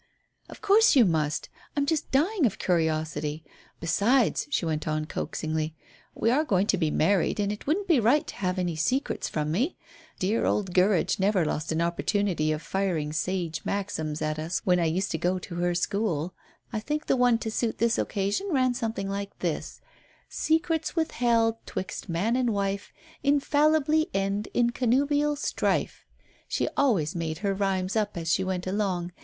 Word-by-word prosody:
"Of - - -12
course 425 -2 +5
you 250 -5 +7
must. 155 -4 0 0.3
I'm 285 - +2
just 315 +1 -1
dying 315 - +2
of 205 - -4
curiosity. 155 -3 -1 0.4
Besides," 210 +10 +2
she 290 - 0
went 155 0 -2
on 155 0 -1
coaxingly, 155 0 -3 0.4
"we 230 - +1
are 290 +5 +3
going 195 - +2
to - - +2
be 160 -3 +1
married, 185 +6 +2
and 205 0 +1
it 210 - -7
wouldn't 385 +7 0
be 330 -8 +4
right 245 +7 +3
to - - -8
have 185 -1 -1
any 175 -2 -1
secrets 255 - -1
from 150 -1 -2
me. 250 - 0 0.4
Dear 205 +5 0
old 190 -4 0
Gurridge 185 0 +3
never 190 -3 +2
lost 155 +1 -2
an 160 +1 0
opportunity 170 -2 0
of 155 +1 -3
firing 175 -6 -1
sage 170 -1 -2
maxims 160 -7 -3
at 155 0 -1
us 160 +3 -2
when 180 -1 +3
I 170 - +2
used 185 +5 0
to 160 - -2
go 180 +3 +1
to 180 0 -8
her 175 0 0
school. 180 -3 -1 0.4
I 215 - 0
think 300 +7 -3
the - - +2
one 245 -2 +4
to 225 -1 -4
suit 225 0 -1
this 235 0 +2
occasion 200 - -1
ran 255 -6 +2
something 225 -4 -3
like 200 0 -4
this - - -3 0.5
'Secrets 320 0 0
withheld 235 -8 +1
'twixt 190 +1 -5
man 190 +8 0
and 255 -1 +1
wife, 200 -1 -2 0.3
Infallibly 300 +2 +3
end 195 +2 0
in 240 -1 +3
connubial 285 +5 +2
strife.' 290 - -1 0.4
"She - - -1
always 195 - +2
made 165 -2 -3
her 200 - +2
rhymes 190 -1 -1
up 210 -3 0
as 165 -1 0
she 190 - +1
went 185 -1 -2
along. 185 -3 -1
195 Hz, 175 wpm, -27 LUFS, 170-245 Hz, 0.5 s, you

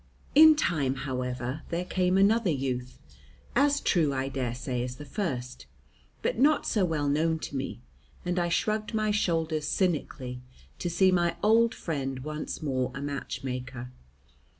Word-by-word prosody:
In 310 +1 +9
time, 145 - 0
however, 125 +1 -3
there 170 +2 -2
came 185 0 +1
another 205 +1 +4
youth, 130 -4 -2 0.6
as 285 +2 +4
true, 165 - +2
I 135 +1 -1
dare 130 -3 -2
say, 125 0 -3
as 125 0 -5
the 150 - -9
first, 125 - -4 0.6
but - - 0
not 295 +3 +4
so 210 - +1
well 155 -4 -1
known 160 +3 +2
to 150 - -6
me, 135 -2 -4 0.4
and 180 0 0
I 175 0 +1
shrugged 215 +5 0
my 215 -1 +1
shoulders 165 -6 0
cynically 145 -7 -1 0.4
to 175 - -2
see 185 +2 +4
my 175 -2 +2
old 225 +2 +4
friend 135 -5 -3
once 155 +2 -5
more 130 -3 -1
a - - -4
matchmaker. 125 -3 -5
155 Hz, 150 wpm, -28 LUFS, 130-185 Hz, 0.6 s, In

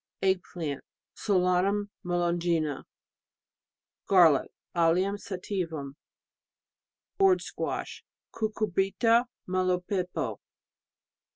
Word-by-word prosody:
Egg 190 -1 +3
plant.... 155 -6 -4 0.3
Solanum 195 +1 +1
melongena. 170 -4 0 1.2
Garlic 170 -7 +5 0.3
AUium 180 +4 +2
sativum. 180 -8 -4 1.3
Gourd 385 -2 +5
squash... - - -4 0.3
Cucurbita 215 +2 +1 0.2
melopepo. 185 0 -1
180 Hz, 60 wpm, -28 LUFS, 170-200 Hz, 1.3 s, Garlic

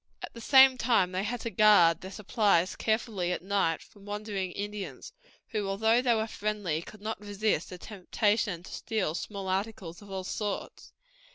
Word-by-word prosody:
At - - -7
the 230 - -10
same 265 +1 +7
time 225 -7 +2
they 185 +1 -1
had 235 +2 -3
to 230 - -4
guard 205 -7 +5
their 190 - -7
supplies 200 -3 +1
carefully 215 -5 -1
at 180 - -3
night 190 -4 0
from 205 - -19
wandering 205 -2 -4
Indians, 205 - -6 0.4
who, 210 -4 -2
although 220 +5 +2
they 245 -2 +3
were 220 0 0
friendly, 205 -7 -2
could 210 +4 -13
not 220 0 -4
resist 205 -4 -1
the 180 - -8
temptation 205 -1 -1
to - - -10
steal 210 -8 -2
small 195 +2 -5
articles 190 -2 -3
of 205 - -14
all 190 -1 -4
sorts. 205 +2 -5
205 Hz, 175 wpm, -29 LUFS, 185-220 Hz, 0.4 s, same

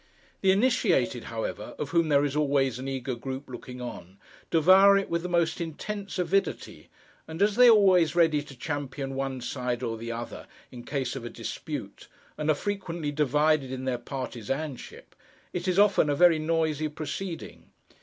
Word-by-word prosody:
The 195 - +3
initiated, 240 +6 +2
however, - - -5
of - - -4
whom 170 -2 +2
there 145 0 +4
is 145 0 -2
always 140 -4 +1
an 130 - -5
eager 130 -1 -3
group 130 +3 -6
looking 125 0 -9
on, 95 -6 -8 0.3
devour 190 +5 +6
it 195 - -2
with 170 0 0
the 180 - -5
most 170 -1 +1
intense 200 +6 -5
avidity; 195 +2 -1 0.4
and 160 +1 -7
as 205 0 +3
they 250 +1 +7
are 235 - +9
always 185 -6 +4
ready 160 -4 +3
to 140 -2 -13
champion 140 -1 -4
one 135 -1 -3
side 125 -1 -3
or 115 -2 -3
the 115 +1 -5
other 115 +1 -7 0.2
in 120 -1 -10
case 135 -3 -2
of 135 - -6
a 120 - -5
dispute, - - -7 0.3
and 150 0 -2
are 155 - +4
frequently 175 -4 -3
divided 150 -1 +2
in 130 0 -5
their 125 -2 -1
partisanship, 135 +2 -6 0.4
it 180 +1 -3
is 180 0 +1
often 200 -6 +4
a 145 - +2
very 170 0 +5
noisy 155 -1 0
proceeding. 155 - -6
150 Hz, 175 wpm, -27 LUFS, 130-175 Hz, 0.4 s, are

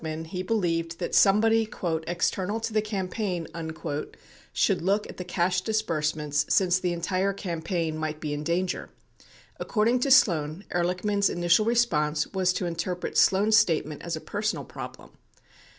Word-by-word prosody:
42 160 - -4
Ehrlichman - - -11
he 185 - -3
believed 170 -5 -1
that 175 - -4
somebody 220 +2 +4 0.4
"external 185 +4 -1
to 225 0 -4
the 215 - +3
campaign" 195 -3 -3 1.1
should - - +1
look 200 +4 +1
at - - -11
the 180 - -4
cash 180 +1 0
disbursements 155 -8 0
since 185 -1 +3
the 180 -1 -1
entire 185 +3 0
campaign 170 -3 -3
might 155 -1 -3
be 150 -2 -3
in 145 0 -4
danger. 175 +3 -1 0.7
According 230 +3 +1
to 275 - 0
Sloan, 170 - +4
Ehrlichman's 180 +4 +1
initial 175 +4 +2
response 155 -11 +2
was 185 -1 +2
to 185 - -2
interpret 175 +1 -3
Sloan's 210 +3 +4
statement 160 -8 +1
as 170 -1 -3
a 160 - -7
personal 215 +2 -3
problem. - - -9
180 Hz, 150 wpm, -26 LUFS, 165-210 Hz, 1.1 s, somebody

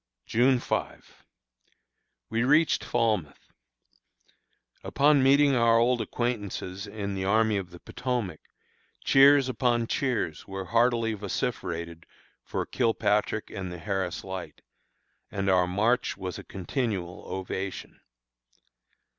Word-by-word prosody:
June 125 +3 +3
5. - - -4 1.1
We 115 +1 +1
reached 150 +5 +3
Falmouth. 105 -11 -1 1.3
Upon 145 0 +3
meeting 140 +1 +5
our 115 -1 +4
old 120 +1 +2
acquaintances 105 -4 -3
in 100 -1 -4
the 95 -1 -3
Army 110 +1 +3
of 95 -3 -4
the 85 -1 -13
Potomac, 120 -10 -3 0.6
cheers 140 0 +6
upon 120 -2 +1
cheers 115 - -2
were 95 -1 -5
heartily 115 +2 +2
vociferated 85 -5 -4 0.4
for - - -3
Kilpatrick 105 -3 0
and 95 -2 -5
the 90 - -6
Harris 95 -1 -3
Light, 95 -2 -7 0.7
and 95 -1 -1
our 90 -1 +3
march 110 +7 +1
was 95 -2 -5
a - - -9
continual 95 -2 -4
ovation. 95 +1 -5
110 Hz, 110 wpm, -27 LUFS, 95-125 Hz, 1.3 s, cheers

